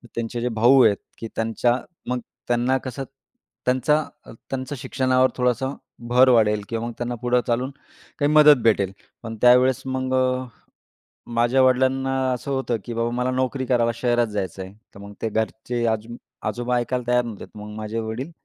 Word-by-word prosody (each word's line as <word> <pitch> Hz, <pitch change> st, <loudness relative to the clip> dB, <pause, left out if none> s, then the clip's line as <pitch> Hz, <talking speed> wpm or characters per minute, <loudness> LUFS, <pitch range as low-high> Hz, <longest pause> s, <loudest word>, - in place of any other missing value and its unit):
त्यांचे 115 Hz, +1 st, -3 dB
जे 125 Hz, -, 0 dB
भाऊ 125 Hz, +3 st, +6 dB
आहेत, 105 Hz, -3 st, +4 dB, 0.2 s
की 115 Hz, -, -6 dB
त्यांच्या 115 Hz, +2 st, +1 dB, 0.3 s
मग 125 Hz, 0 st, 0 dB, 0.3 s
त्यांना 120 Hz, +2 st, +2 dB
कसं, 130 Hz, +1 st, -4 dB, 0.6 s
त्यांचा 130 Hz, +5 st, +2 dB, 0.5 s
त्यांच्या 135 Hz, +2 st, -4 dB
शिक्षणावर 130 Hz, 0 st, +2 dB
थोडासा 125 Hz, +2 st, 0 dB, 0.4 s
भर 125 Hz, +2 st, +6 dB
वाढेल 105 Hz, -3 st, +4 dB
किंवा 115 Hz, 0 st, -3 dB
मग 120 Hz, -, -6 dB
त्यांना 120 Hz, 0 st, -3 dB
पुढं 125 Hz, 0 st, +2 dB
चालून 125 Hz, +3 st, 0 dB, 0.5 s
काही 145 Hz, 0 st, +2 dB
मदत 150 Hz, -3 st, +7 dB
भेटेल. 100 Hz, -4 st, +2 dB, 0.3 s
पण 115 Hz, -1 st, -6 dB
त्यावेळेस 125 Hz, +1 st, +5 dB
मग 130 Hz, 0 st, -2 dB
अ, 130 Hz, 0 st, +1 dB, 0.9 s
माझ्या 120 Hz, +3 st, +3 dB
वडिलांना 130 Hz, +1 st, +2 dB, 0.2 s
असं 125 Hz, +3 st, -5 dB
होतं, 130 Hz, -3 st, -1 dB
की 120 Hz, -, -5 dB
बाबा 115 Hz, 0 st, -1 dB
मला 125 Hz, +1 st, -1 dB
नोकरी 130 Hz, +1 st, -1 dB
करायला 120 Hz, -2 st, +2 dB
शहरात 120 Hz, 0 st, +1 dB
जायचं 100 Hz, -3 st, -4 dB
आहे. 95 Hz, +1 st, -11 dB, 0.2 s
तर 100 Hz, -, -11 dB
मग 100 Hz, 0 st, -10 dB
ते 115 Hz, -, -1 dB
घरचे, 110 Hz, +2 st, -2 dB
आज 110 Hz, 0 st, -1 dB, 0.4 s
आजोबा 120 Hz, +3 st, -1 dB
ऐकायला 125 Hz, +1 st, -1 dB
तयार 125 Hz, 0 st, +3 dB
नव्हते. 110 Hz, -4 st, -7 dB
मग 105 Hz, 0 st, -8 dB
माझे 110 Hz, +1 st, -4 dB
वडील 115 Hz, +8 st, -5 dB
125 Hz, 165 wpm, -23 LUFS, 115-130 Hz, 0.9 s, मदत